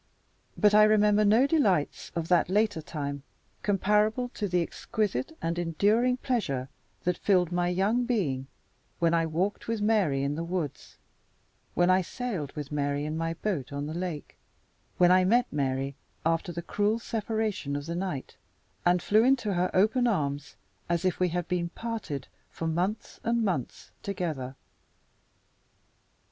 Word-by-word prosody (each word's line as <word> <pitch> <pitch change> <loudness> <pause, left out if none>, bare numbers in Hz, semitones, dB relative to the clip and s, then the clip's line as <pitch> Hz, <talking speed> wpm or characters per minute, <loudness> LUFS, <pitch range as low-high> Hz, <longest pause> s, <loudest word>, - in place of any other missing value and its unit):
But 210 -1 +4
I 210 - +8
remember 210 0 +4
no 220 +5 +5
delights 215 - +1
of 165 -1 -2
that 175 -1 +3
later 205 -3 +2
time 140 -2 -4 0.4
comparable 210 +4 +2
to 210 -4 -3
the 180 -1 +1
exquisite 165 - -3
and 170 +1 -1
enduring 210 +9 +2
pleasure 140 - -1 0.3
that 180 0 0
filled 180 -4 +2
my 175 0 +1
young 200 +7 +1
being 150 - -1 0.5
when 170 -1 +2
I 165 -1 +2
walked 180 +6 -2
with 225 -1 -1
Mary 205 -11 +2
in 140 +1 0
the 165 +3 -3
woods; 170 -4 -4 0.8
when 175 +1 +4
I 185 +1 +4
sailed 185 - -4
with 150 -2 -6
Mary 145 0 -1
in 155 +1 -3
my 165 0 -2
boat 165 -8 -3
on 140 0 -3
the 155 - -5
lake; 175 -3 -5 0.6
when 180 0 +6
I 185 0 +6
met 240 +6 +4
Mary, 135 -1 -1 0.3
after 165 +2 +1
the 170 0 -5
cruel 210 +5 +1
separation 220 -8 -2
of 145 0 -4
the 165 - -4
night, 175 -6 -4 0.5
and 175 0 +3
flew 215 +2 +4
into 245 -5 +2
her 180 0 +1
open 225 +6 +3
arms 145 - -1 0.3
as 170 +1 0
if 185 - +1
we 180 -1 +2
had 175 0 -2
been 175 -2 -1
parted 200 - -5 0.2
for 165 - -6
months 180 +7 -2
and 235 -1 +1
months 170 - -3
together. 155 -10 -3
180 Hz, 155 wpm, -28 LUFS, 155-210 Hz, 0.8 s, I